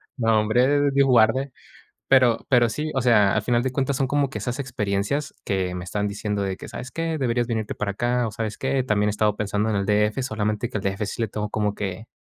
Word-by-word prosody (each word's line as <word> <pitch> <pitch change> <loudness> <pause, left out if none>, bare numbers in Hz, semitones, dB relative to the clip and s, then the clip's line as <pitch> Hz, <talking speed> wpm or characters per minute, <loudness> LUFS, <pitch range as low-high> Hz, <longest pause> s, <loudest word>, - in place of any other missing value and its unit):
nombre, 125 +5 +3
Dios 140 0 +3
guarde". 130 +3 +3 0.6
Pero 125 -4 +4
pero 120 -2 +4
sí, 150 +6 -3
o 135 - 0
sea, 105 -5 +4
al 105 - +1
final 120 +2 +1
de 130 0 -2
cuentas 135 0 0
son 135 - +1
como 140 0 0
que 110 - -5
esas 120 +5 -4
experiencias, 125 +2 -2
que 95 -2 -1
me 90 -1 -5
están 105 +3 -2
diciendo 105 0 -3
de 95 -1 -2
que: - - -10
"¿Sabes 130 - -7
qué? 165 +1 -2
Deberías 120 -3 0
venirte 110 -3 -2
para 105 - -2
acá". 120 +4 0
O, - - -6
¿sabes 110 -1 -4
qué?, 135 0 0
también 105 -3 +1
he - - +2
estado 105 0 +1
pensando 105 +1 -1
en 105 - 0
el 100 0 -1
D.F. 105 +4 +1
Solamente 110 -1 -2
que 110 - -2
al - - -7
D.F. 100 +2 -1
sí 105 - -5
le 115 - 0
tengo 105 +1 -4
como 105 -1 -1
que, 100 +1 -5
110 Hz, 235 wpm, -24 LUFS, 105-130 Hz, 0.6 s, Pero